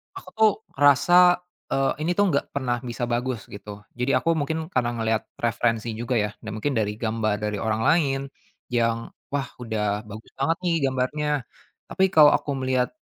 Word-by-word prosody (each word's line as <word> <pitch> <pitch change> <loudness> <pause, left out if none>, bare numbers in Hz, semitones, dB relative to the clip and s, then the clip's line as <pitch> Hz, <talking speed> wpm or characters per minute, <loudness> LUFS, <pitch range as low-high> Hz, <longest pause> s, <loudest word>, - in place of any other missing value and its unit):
aku 185 - -10
tuh 215 -1 +6 0.3
ngerasa, 175 +6 +6 0.3
eee, 135 0 +2 0.2
ini - - +2
tuh 205 -3 +3
nggak 140 0 -2
pernah 125 -3 -1
bisa 120 -1 -5
bagus 120 -1 -2
gitu. 105 0 -9
Jadi 125 +2 +1
aku 165 +5 +1
mungkin 160 +3 -3
karena 120 -2 +1
ngelihat 110 -1 0
referensi 115 -1 0
juga 120 +1 -2
ya 105 -2 +1
dan 110 - -7
mungkin 140 +7 -1
dari 105 -1 0
gambar 110 -2 -1
dari 105 -1 -2
orang 110 0 -1
lain 140 -5 +3 0.5
yang, 115 -1 0 0.2
"Wah, 135 -3 -1
udah 105 -3 -2
bagus 110 +2 -10
banget 165 +5 +1
nih 170 -2 +1
gambarnya." 135 +4 -1 0.6
Tapi 190 - +3
kalau 150 -2 +8
aku 145 - 0
melihat, 130 -1 0
125 Hz, 170 wpm, -24 LUFS, 110-145 Hz, 0.6 s, kalau